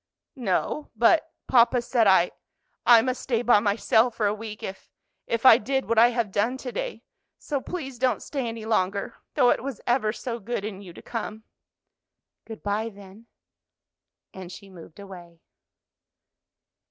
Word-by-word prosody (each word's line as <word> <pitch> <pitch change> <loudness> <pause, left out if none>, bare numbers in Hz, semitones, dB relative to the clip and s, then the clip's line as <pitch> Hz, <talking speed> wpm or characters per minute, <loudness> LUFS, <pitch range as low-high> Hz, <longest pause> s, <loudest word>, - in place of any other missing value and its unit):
"No; 235 +8 -1
but 315 +9 +3 0.2
papa 245 0 +4
said 240 -2 +1
I 185 -2 +4 0.6
I 235 -2 +8
must 255 0 -2
stay 235 -2 -1
by 240 -4 +5
myself 220 +3 +2
for 215 - 0
a 205 - +2
week 215 0 -8
if 190 - -8 0.4
if 230 +2 -2
I 240 -3 +9
did 265 +4 -2
what 230 -1 +3
I 235 - +8
have 235 -4 -2
done 230 +7 0
to 260 -1 -6
day. - - -5 0.3
So 285 -3 -3
please 270 -8 -6
don't 255 0 +1
stay 270 -4 -3
any 225 -1 -6
longer, 200 0 -1 0.2
though 250 -4 +5
it - - 0
was 270 -5 -5
ever 240 -3 +1
so 235 +1 -5
good 215 -1 -4
in 200 -2 -6
you 185 -3 -11
to - - -14
come." 220 -2 -6 1.0
"Good 220 -1 -10
by, 210 +2 -1
then," 200 +2 -15 1.1
and 185 -2 -9
she 195 0 -12
moved 170 0 -14
away. 175 -4 -12
225 Hz, 165 wpm, -25 LUFS, 200-245 Hz, 1.1 s, I